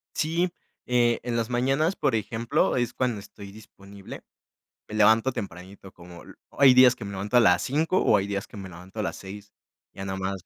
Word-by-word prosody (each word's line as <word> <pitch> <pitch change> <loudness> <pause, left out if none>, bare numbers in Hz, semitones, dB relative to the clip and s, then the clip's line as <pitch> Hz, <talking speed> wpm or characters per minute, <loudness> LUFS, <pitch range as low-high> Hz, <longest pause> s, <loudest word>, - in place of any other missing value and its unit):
Sí. 170 +3 0 0.4
Eh, 120 -1 +2
en 120 -1 -2
las 115 +1 -2
mañanas, 135 +8 0
por 130 - 0
ejemplo, 110 +2 -1
es 120 -2 -1
cuando 120 -5 -1
estoy 100 0 -12
disponible. 100 -2 -13 0.6
Me 110 - -8
levanto 110 +4 +4
tempranito. 95 -1 -9
Como 85 0 -14
l - - -14 0.2
Hay 135 -2 +6
días 130 0 +6
que 110 - -9
me 100 - -6
levanto 100 +5 -1
a - - +8
las 90 -6 +4
5:00, 160 - 0
o - - +4
hay 100 - -2
días, 100 -1 -4
que - - -13
me 95 -2 -8
levanto 90 +5 -11
a - - -1
las 85 -2 -3
6:00. 100 +3 -11 0.4
Ya 95 - -8
nada 95 0 -4
más. 95 -1 -4
105 Hz, 205 wpm, -25 LUFS, 95-125 Hz, 0.6 s, a